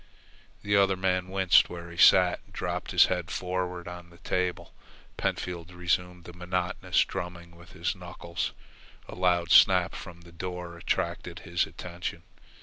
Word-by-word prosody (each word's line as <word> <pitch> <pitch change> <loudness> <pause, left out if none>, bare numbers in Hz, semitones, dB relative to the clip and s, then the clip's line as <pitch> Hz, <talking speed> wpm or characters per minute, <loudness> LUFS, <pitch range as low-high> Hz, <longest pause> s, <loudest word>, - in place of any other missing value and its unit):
The 105 0 +1
other 100 -1 +4
man 90 -1 0
winced 95 -1 +4
where 85 -1 -8
he 85 - -11
sat 90 -2 +6
and - - -23
dropped - - -3
his - - +6
head 90 -3 -2
forward 90 -1 -3
on 90 0 -9
the 85 - -17
table. 90 0 -2 0.4
Pentfield 85 -1 -3
resumed 90 0 -1
the 85 - -11
monotonous 90 0 0
drumming 85 -1 -7
with 85 +2 -16
his 90 +3 -2
knuckles. 90 -1 -5 0.6
A - - -9
loud 90 -2 +1
snap - - +6
from 85 0 -9
the 85 0 -15
door 90 0 -6
attracted 85 - -3
his 85 0 0
attention. 85 -1 -7
90 Hz, 150 wpm, -28 LUFS, 85-90 Hz, 0.6 s, sat